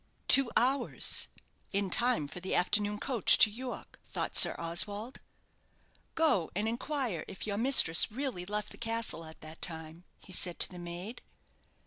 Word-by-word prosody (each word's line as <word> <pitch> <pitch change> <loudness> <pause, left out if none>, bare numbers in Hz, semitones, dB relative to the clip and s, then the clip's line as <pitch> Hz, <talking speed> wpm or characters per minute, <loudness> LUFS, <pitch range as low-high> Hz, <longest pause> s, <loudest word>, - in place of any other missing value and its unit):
"Two 275 -3 +4
hours! 265 +3 +1 0.4
In 200 -1 -2
time 240 -9 +1
for 180 - -9
the 185 +1 -4
afternoon 205 +3 +1
coach 245 -5 +3
to 215 - +5
York," 250 +3 -9
thought - - -5
Sir - - +7
Oswald. 205 +8 -2 1.0
"Go 300 - +1
and 210 +3 -2
inquire 240 - -4
if 190 - -7
your 205 -1 -4
mistress 225 -7 +5
really 255 -6 -4
left 210 +1 -5
the - - -12
castle 230 -6 -2
at 160 0 -14
that 155 +1 -12
time," 160 +1 -7
he 185 - -12
said 175 -1 -1
to - - +5
the 180 - -10
maid. 175 +7 -8
205 Hz, 155 wpm, -30 LUFS, 175-240 Hz, 1.0 s, Sir